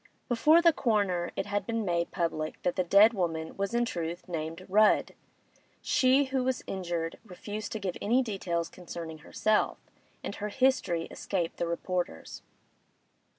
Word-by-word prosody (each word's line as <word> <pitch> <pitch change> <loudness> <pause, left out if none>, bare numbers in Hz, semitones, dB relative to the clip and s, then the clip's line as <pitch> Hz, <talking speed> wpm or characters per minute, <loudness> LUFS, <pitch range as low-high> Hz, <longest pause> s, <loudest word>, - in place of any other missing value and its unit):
Before 305 +8 +5
the 335 -1 +6
coroner 200 -9 +1
it 195 - -2
had 205 0 -2
been 230 -2 -1
made 170 -2 0
public 160 -3 -2
that 180 - 0
the 185 - +1
dead 200 +6 +6
woman 165 -5 -2
was 200 +3 -2
in 240 0 +3
truth 175 -5 -4
named 165 +1 -5
Rudd; 210 +3 +4 0.7
she 275 -1 +3
who 265 -1 -1
was 260 0 -1
injured 175 -3 -3
refused 205 +1 -7
to 220 - -3
give 190 -3 -3
any 245 +5 +3
details 180 -6 -2
concerning 165 -3 -8
herself, 215 +7 +1 0.5
and - - -4
her 210 - -3
history 255 -9 +1
escaped 175 -4 -3
the 170 - -1
reporters. 175 - -3
195 Hz, 150 wpm, -29 LUFS, 170-225 Hz, 0.7 s, the